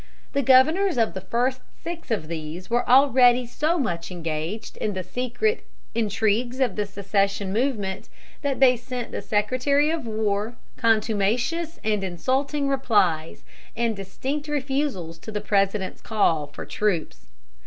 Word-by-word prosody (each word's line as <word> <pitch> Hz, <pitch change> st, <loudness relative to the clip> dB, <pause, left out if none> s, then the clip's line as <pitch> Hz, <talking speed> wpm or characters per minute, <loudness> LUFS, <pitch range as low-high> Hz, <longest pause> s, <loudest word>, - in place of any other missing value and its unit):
The 280 Hz, -, +2 dB
governors 300 Hz, +8 st, +4 dB
of 225 Hz, -2 st, +2 dB
the 190 Hz, -, -5 dB
first 250 Hz, +6 st, 0 dB, 0.2 s
six 335 Hz, -2 st, -6 dB
of 210 Hz, -9 st, -1 dB
these 165 Hz, +4 st, -6 dB
were 240 Hz, +1 st, +1 dB
already 255 Hz, -2 st, +6 dB
so 305 Hz, +8 st, 0 dB
much 175 Hz, -, -2 dB
engaged 165 Hz, +4 st, -4 dB
in 210 Hz, -, -2 dB
the 185 Hz, -1 st, -3 dB
secret 255 Hz, -, -1 dB, 0.3 s
intrigues 220 Hz, +3 st, 0 dB
of 250 Hz, -7 st, +1 dB
the 210 Hz, -1 st, -1 dB
secession 200 Hz, 0 st, -1 dB
movement 210 Hz, -6 st, -1 dB, 0.3 s
that 280 Hz, -2 st, -1 dB
they 255 Hz, -2 st, +6 dB
sent 245 Hz, 0 st, -6 dB
the -, -, -4 dB
Secretary 255 Hz, +8 st, +1 dB
of 325 Hz, -7 st, -3 dB
War 215 Hz, +1 st, -1 dB, 0.2 s
contumacious 230 Hz, +9 st, +1 dB
and 210 Hz, -2 st, 0 dB
insulting 265 Hz, -, -1 dB
replies, 205 Hz, -12 st, +1 dB, 0.3 s
and 230 Hz, -1 st, +1 dB
distinct 265 Hz, +10 st, -4 dB
refusals 270 Hz, -, -2 dB
to 220 Hz, -, -8 dB
the 210 Hz, -, -2 dB
President's 195 Hz, -1 st, 0 dB
call 165 Hz, -9 st, +1 dB
for 145 Hz, -, -9 dB
troops. 210 Hz, -9 st, -2 dB
225 Hz, 140 wpm, -24 LUFS, 195-265 Hz, 0.3 s, already